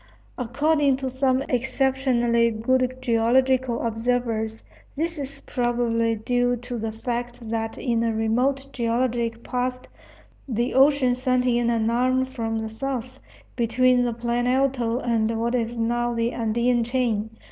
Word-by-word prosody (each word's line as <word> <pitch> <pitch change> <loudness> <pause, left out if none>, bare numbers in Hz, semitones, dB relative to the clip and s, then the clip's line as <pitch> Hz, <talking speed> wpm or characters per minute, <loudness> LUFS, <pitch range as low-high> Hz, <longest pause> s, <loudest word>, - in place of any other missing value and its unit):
According 280 +3 +1
to 265 -1 -4
some 260 0 +1
exceptionally 250 -2 +1
good 255 +3 0
geological 250 +1 +2
observers, 225 -1 -1 0.3
this 330 +1 -2
is 275 0 -6
probably 235 -2 0
due 245 +3 +1
to 245 0 -6
the 220 0 -3
fact 240 0 -5
that 225 -1 -2
in 235 -3 0
a 230 - +1
remote 245 +5 0
geologic 235 -1 -1
past 250 0 -3 0.6
the 240 -1 -1
ocean 270 -1 +4
sent 255 0 0
in 240 -1 +2
an 230 -1 +1
arm 255 +2 +2
from 230 -4 -3
the 220 0 -3
south, 255 +2 -5 0.4
between 245 +1 +3
the 240 -1 0
Plan 240 +1 -1
Alto 255 -3 +1
and 230 -3 0
what 235 +1 0
is 235 -1 -1
now 240 +1 0
the 230 +1 0
Andean 235 +1 +1
chain. 230 -3 -1
240 Hz, 135 wpm, -24 LUFS, 230-255 Hz, 0.6 s, ocean